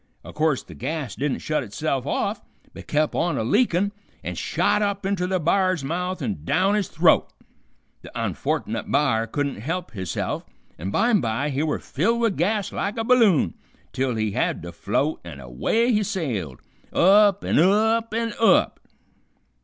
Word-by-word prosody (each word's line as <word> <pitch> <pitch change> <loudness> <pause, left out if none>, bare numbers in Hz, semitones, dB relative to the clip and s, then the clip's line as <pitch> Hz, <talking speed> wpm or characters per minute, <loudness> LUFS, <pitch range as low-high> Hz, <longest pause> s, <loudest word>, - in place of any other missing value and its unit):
O' - - -10
course 155 -3 +1
the - - -13
gas 145 -2 -4
didn't 140 -1 -2
shut 155 -1 0
itself 135 +4 -3
off, 205 +7 -1 0.3
but - - -11
kep' 155 0 +1
on 165 -4 0
a - - 0
leakin' 200 - +2 0.3
an' - - -4
shot 210 - 0
up 200 -1 -1
inter 190 -2 0
the 185 0 0
b'ar's 185 -1 +1
mouth 180 +3 -3
and 100 - -3
down 190 - +2
his 210 -3 0
throat. 165 0 +3 0.7
The - - -11
onfortnit - - -2
b'ar 115 -6 +2
couldn't 140 +4 -2
help 165 - -4
hisself, 95 -6 -3 0.4
an' 90 +5 -4
bimby 145 - +1
he 135 +2 -1
were 155 -1 0
filled 225 +12 0
with 230 -5 +1
gas 200 +3 0
like 200 +2 -3
a 225 - 0
balloon, 225 - +4 0.4
till 130 -2 -1
he 110 -1 -1
had - - -1
to - - -7
float, 155 +3 -1
an' 85 -5 -9
away 70 - 0
he 215 -2 +2
sailed, 115 - -3 0.3
up 200 +2 +5
an' - - +2
up 220 +6 +3
an' 230 0 -1
up. 225 - +4
165 Hz, 165 wpm, -23 LUFS, 135-205 Hz, 0.7 s, up